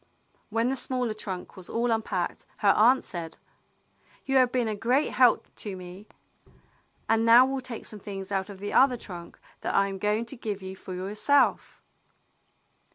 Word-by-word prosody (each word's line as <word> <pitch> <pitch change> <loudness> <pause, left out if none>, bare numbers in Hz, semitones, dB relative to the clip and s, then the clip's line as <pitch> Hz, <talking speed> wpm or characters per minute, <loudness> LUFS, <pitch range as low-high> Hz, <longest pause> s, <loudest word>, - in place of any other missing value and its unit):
When 225 +3 +1
the 265 - 0
smaller 250 -3 -1
trunk 190 -4 -7
was 185 -2 -10
all 235 +1 0
unpacked, 215 -5 -2 0.2
her 200 - +7
aunt 245 +5 +5
said, 165 -2 -6 0.9
"You 270 0 +2
have 255 -2 +4
been 245 -3 0
a 215 - -1
great 245 +8 +1
help 250 -2 +4
to 205 -3 -6
me, 185 +3 -11 1.0
and 225 0 +3
now 235 +2 +8
we'll 270 0 -2
take 250 -3 -7
some 215 -3 -4
things 195 -1 -6
out 195 0 -1
of 200 - -9
the 205 +1 -5
other 260 -2 +5
trunk 175 -6 -9 0.2
that - - -3
I 195 0 +3
am 195 -1 -6
going 210 +3 0
to 255 - -7
give 210 -5 -5
you 190 0 -6
for 185 -1 -8
yourself." 210 +10 +1
215 Hz, 175 wpm, -27 LUFS, 195-245 Hz, 1.0 s, now